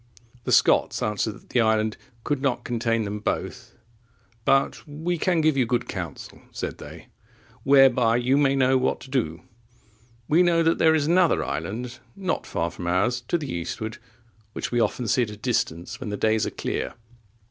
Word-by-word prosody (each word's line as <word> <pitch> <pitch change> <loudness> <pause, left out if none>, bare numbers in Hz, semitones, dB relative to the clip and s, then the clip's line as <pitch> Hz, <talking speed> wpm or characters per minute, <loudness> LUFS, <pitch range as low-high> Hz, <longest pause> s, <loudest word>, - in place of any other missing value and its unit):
The - - -1
Scots - - +3
answered 105 +1 -1
that - - -17
the 125 - +3
island 110 -1 +2 0.3
could 145 -3 -1
not 125 -3 0
contain 115 -1 0
them 105 +1 -4
both; 105 - -4 0.7
but 135 0 +2
"We 160 +4 -3
can 175 -2 +2
give 155 -2 +3
you 130 -3 +2
good 120 0 0
counsel," 85 -6 -7
said - - -5
they, - - -11 0.5
"whereby 130 -4 +5
you 125 +2 +2
may 140 -1 +3
know 130 -1 +3
what 130 - 0
to 130 - -12
do; 85 - -1 0.8
we 160 +4 +4
know 170 -2 +3
there 160 -1 +4
is 150 -2 +1
another 175 +1 +3
island, 120 +4 -4 0.2
not 190 -2 -3
far 85 0 -2
from 90 - -7
ours, 120 +8 +1
to 175 - +1
the 145 -4 -5
eastward, 105 +6 -5 0.5
which - - -4
we 120 - +1
often 120 +1 0
see 125 - +2
at 115 - 0
a 105 - -8
distance, 95 -8 -2
when 125 - -5
the 105 - -3
days 110 0 +1
are - - -1
clear. - - -4
125 Hz, 180 wpm, -25 LUFS, 110-145 Hz, 0.8 s, whereby